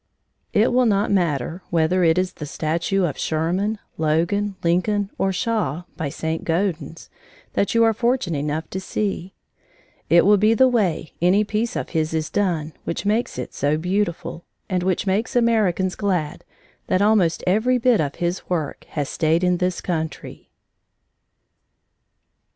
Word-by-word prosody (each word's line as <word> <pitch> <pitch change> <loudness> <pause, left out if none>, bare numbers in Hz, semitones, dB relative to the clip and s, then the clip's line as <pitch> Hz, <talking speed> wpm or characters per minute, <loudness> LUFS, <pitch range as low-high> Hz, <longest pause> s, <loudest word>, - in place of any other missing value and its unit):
It 220 +4 +3
will 250 -1 +4
not 205 0 +1
matter 170 -3 0
whether 170 +2 +2
it 165 0 +4
is 185 0 0
the 150 - -7
statue 170 +6 -1
of 150 - -4
Sherman, 180 +7 0 0.2
Logan, 170 +6 +1
Lincoln, 195 +4 +1
or 195 - +2
Shaw 185 - -1
by 155 -4 -3
St. 160 +3 -3
Gaudens 170 -1 -2 0.5
that 200 - 0
you 230 - +5
are 225 0 +4
fortunate 230 - 0
enough 150 +2 -2
to 190 - -3
see; 190 -1 -3 0.7
it 170 +2 +6
will 205 +1 +6
be 215 +3 +3
the 260 +2 +5
way 195 - 0
any 185 +4 +4
piece 220 +3 -2
of - - -3
his 160 -1 -1
is 155 -1 -2
done 170 -6 -1
which 170 - -4
makes 215 - 0
it 125 - -5
so 145 +2 0
beautiful, 180 -1 -2 0.2
and 185 -1 -1
which 185 +1 0
makes 200 +5 -1
Americans 210 -6 +2
glad 180 -7 -2 0.4
that 185 - +2
almost 205 -6 +3
every 220 +7 +2
bit 245 -4 +3
of 145 -2 -2
his 175 +1 -3
work 160 -5 -3
has 145 -3 -2
stayed 160 +4 +1
in 180 0 +2
this 180 0 -1
country. 160 -3 -5
180 Hz, 155 wpm, -22 LUFS, 160-205 Hz, 0.7 s, it